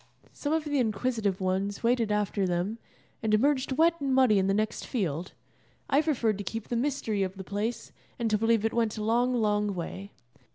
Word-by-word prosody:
Some 290 - -3
of 320 0 +1
the 290 -2 0
inquisitive 220 -3 0
ones 190 +3 -1
waded 230 -2 +2
after 205 -2 0
them, 180 +6 -1 0.4
and 215 -1 +2
emerged 265 +3 +2
wet 335 +3 +3
and 270 -2 +1
muddy 250 -6 +5
in 190 - +1
the 195 - +2
next 215 +1 -1
field. 180 - -2 0.6
I 285 +2 +5
preferred 235 -10 0
to - - -3
keep 225 +4 -5
the 240 - -1
mystery 240 -5 -1
of 190 0 -2
the 190 - -6
place, 205 +5 -3 0.3
and 235 - -1
to 210 - +4
believe 225 -1 +2
it 225 - 0
went 230 -2 0
a 215 - -3
long, 240 +3 +2
long 210 -3 +1
way. 190 +3 -6
220 Hz, 200 wpm, -28 LUFS, 200-250 Hz, 0.6 s, muddy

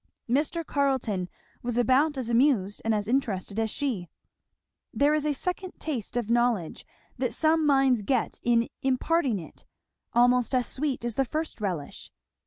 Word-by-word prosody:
Mr. 300 +6 0
Carleton 255 -11 0 0.3
was 240 -1 -3
about 270 +5 +3
as 255 -3 -2
amused 235 -5 +2
and 225 - +1
as 205 -1 -2
interested 220 -5 -1
as 220 0 0
she. 220 - -3 0.8
There 290 +2 +3
is 305 0 +1
a 295 - +2
second 360 +5 -4
taste 245 -7 -4
of 240 -3 -1
knowledge 235 -8 0 0.3
that - - -1
some 315 -1 +3
minds 270 -5 +4
get 245 +3 -1
in 235 -1 +2
imparting 265 -1 +1
it, 165 - -11 0.5
almost 245 +1 +3
as 250 -1 +2
sweet 270 -4 -3
as 240 - -1
the 270 - +1
first 310 -2 -4
relish. 175 -8 -4
250 Hz, 155 wpm, -27 LUFS, 225-285 Hz, 0.8 s, minds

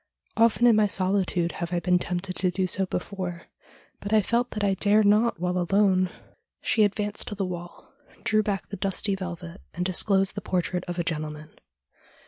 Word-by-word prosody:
Often 230 +1 +4
in 235 -2 +6
my 215 -1 +4
solitude 185 -3 0
have 170 0 -5
I 175 - +1
been 180 +1 +2
tempted 180 +1 -3
to 185 - +2
do 185 +1 -1
so 190 +1 -1
before, 180 -2 -4 0.5
but 200 - -6
I 215 -1 +4
felt 240 +4 0
that 210 - -4
I 200 -1 +3
dare 205 +3 +3
not 210 0 +3
while 180 +1 0
alone.' 185 0 +3 0.5
She 220 - +2
advanced 205 0 -1
to 205 - -4
the 195 -1 -1
wall, 175 +3 -8 0.3
drew 215 -1 +3
back 200 -3 -3
the 200 - -6
dusty 195 +2 -1
velvet, 180 -1 -6
and 180 +1 -2
disclosed 190 +1 +2
the - - -5
portrait 180 0 -1
of 175 0 -4
a 175 - 0
gentleman. 155 -2 -4
190 Hz, 185 wpm, -26 LUFS, 180-205 Hz, 0.5 s, in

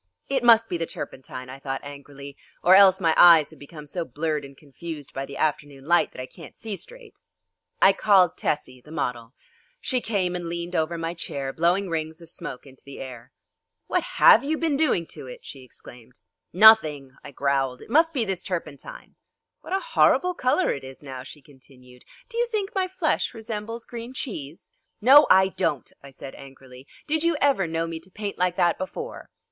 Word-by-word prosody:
"It 265 -3 0
must 230 -1 +6
be 175 - -3
the 165 -1 -3
turpentine," 130 -1 -8
I 130 +1 -10
thought 135 -1 -5
angrily, 140 0 -10 0.3
"or 180 - +6
else 190 -1 +7
my 165 -3 +2
eyes 165 -4 +7
have - - -16
become 150 +1 -11
so 170 +4 -4
blurred 150 +1 -3
and 140 -1 -12
confused 150 0 -9
by 135 +1 -5
the 140 - -9
afternoon 145 -3 -2
light 170 +2 +3
that - - -12
I 130 - -4
can't 150 +3 -14
see 220 -3 -6
straight." 485 - -13 0.6
I 195 - +7
called 190 -4 +4
Tessie, 130 -4 -3
the 150 - -18
model. 125 -6 -4 0.4
She 255 - -1
came 190 -6 -1
and 175 -1 -5
leaned 170 +1 -5
over 165 +1 0
my 165 0 -3
chair 140 -5 -5
blowing 180 +4 +1
rings 160 -1 -4
of 165 -1 -13
smoke 125 - -8
into 130 -1 -16
the 140 - -11
air. 125 -3 -9 0.5
"What - - 0 0.2
have 235 - +7
you 310 +3 -1
been 320 -3 0
doing 275 - +1
to - - -10
it?" 125 - -11
she 135 - -10
exclaimed 125 0 -15 0.3
"Nothing," 165 -10 +5
I - - -9
growled, 135 -2 -1
"it - - -16
must 325 +4 +4
be 255 -7 -1
this 190 -3 -3
turpentine!" 165 -6 -7 0.4
"What - - -13
a 385 - +2
horrible 360 0 +4
colour 295 +4 +1
it 140 - -7
is 130 +2 -11
now," 130 -2 -7
she 140 +2 -13
continued. 130 -3 -19 0.2
"Do 470 -1 -5
you 480 - +2
think 430 -4 -3
my 380 -1 0
flesh 360 -8 -1
resembles 225 +1 -6
green 240 +2 -8
cheese?" 160 - -6 0.3
"No, 270 +7 +7
I 190 0 +6
don't," 185 -8 -2
I 140 - -12
said 135 0 -10
angrily; 135 -1 -14 0.2
"did 315 +1 -1
you 335 -2 +1
ever 265 -11 +2
know 165 0 -2
me 165 -1 -6
to 170 +4 -14
paint 205 +1 -6
like 180 -1 +1
that 175 -2 +1
before?" 460 - -7
165 Hz, 195 wpm, -24 LUFS, 140-220 Hz, 0.6 s, else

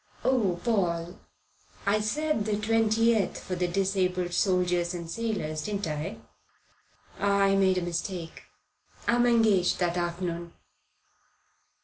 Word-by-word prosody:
"Oh, 205 -9 +1
Paul, 175 -4 0 0.7
I 205 +2 +3
said 295 +1 0
the 215 - 0
20th 225 0 +2
for 185 - -6
the 180 0 0
Disabled 185 -1 0
Soldiers 180 -2 +1
and 170 -1 -6
Sailors, 165 -6 -3
didn't 205 +2 -3
I? 150 -1 -4 1.0
I 200 -1 +3
made 190 -1 +3
a 180 - 0
mistake. 175 0 -4 0.6
I'm 240 +1 +3
engaged 220 -6 +3
that 175 -1 0
afternoon." 175 -1 -3
190 Hz, 110 wpm, -28 LUFS, 175-215 Hz, 1.0 s, I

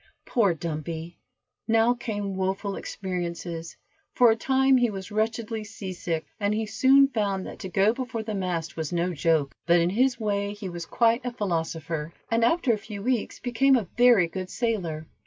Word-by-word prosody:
Poor 200 -8 +2
Dumpy! 165 +1 -5 0.5
Now 225 +1 +4
came 205 -5 -4
woful 190 +1 -2
experiences, 175 -3 -5 0.4
for 240 -2 +6
a - - +2
time 265 +3 +3
he 245 -1 +3
was 195 -1 -7
wretchedly 220 +1 -1
seasick, 185 -6 -4
and 205 0 +1
he 220 0 -1
soon 265 +6 +5
found 200 -6 -1
that - - -9
to 190 - -6
go 195 +4 +3
before 235 -3 -4
the 215 0 -4
mast 180 -5 -2
was 160 -2 -3
no 175 +1 0
joke, 155 -2 +1
but 170 0 +5
in 170 +1 +2
his 245 +3 +2
way 205 -2 -1
he 205 -2 -6
was 175 -1 -6
quite 235 +1 +2
a 245 - -2
philosopher, 165 -6 -3 0.2
and 230 0 +2
after 265 0 +3
a 215 - -2
few 205 -1 -8
weeks 250 -2 -1
became 260 +3 +3
a 225 -7 0
very 240 -6 +6
good 185 +2 -6
sailor. 185 -11 -2
200 Hz, 175 wpm, -26 LUFS, 175-230 Hz, 0.5 s, for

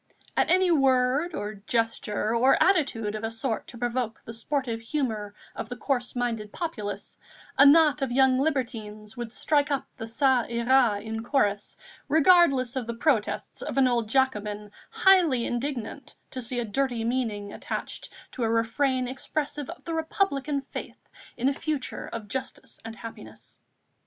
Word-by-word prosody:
At - - +2
any 370 -1 +4
word, 270 +2 +3
or 210 +1 -4
gesture, 220 0 -1
or 255 +3 +5
attitude 270 - +2
of 215 0 -5
a 225 - -1
sort 225 0 -3
to 235 - -10
provoke 240 -1 -2
the 230 - -7
sportive 235 -1 -2
humour 225 -6 -3 0.2
of 220 - -5
the 245 - -4
coarse 245 -1 -2
minded 230 -4 -2
populace, 220 - -5 0.4
a 280 - +8
knot 300 -1 +6
of 270 -2 -1
young 260 0 +4
libertines 225 -7 -2
would 240 -2 -5
strike 290 +3 +1
up 275 -2 -1
the 225 - -5
Ça 245 +1 +2
ira 235 -2 +3
in 220 +1 -5
chorus, 210 -6 0 0.3
regardless 300 -6 +5
of 250 -4 -3
the 235 - -3
protests 235 -3 0
of - - -4
an 265 -1 +5
old 235 -3 0
Jacobin, 210 -5 0 0.2
highly 345 -11 +4
indignant 255 +1 -4 0.2
to 255 - -4
see 245 +1 -1
a 240 - -1
dirty 240 +1 -1
meaning 225 -4 -2
attached - - -5 0.2
to 250 - -4
a 225 - +1
refrain 250 +3 +1
expressive 285 +2 -3
of 340 - -9
the 335 - -4
Republican 305 -4 0
faith - - -8 0.3
in 250 - +1
a 280 - +3
future 295 -2 -3
of 225 -2 -6
justice 265 +5 -5
and 225 0 -7
happiness. 115 - -11
245 Hz, 160 wpm, -27 LUFS, 225-275 Hz, 0.4 s, a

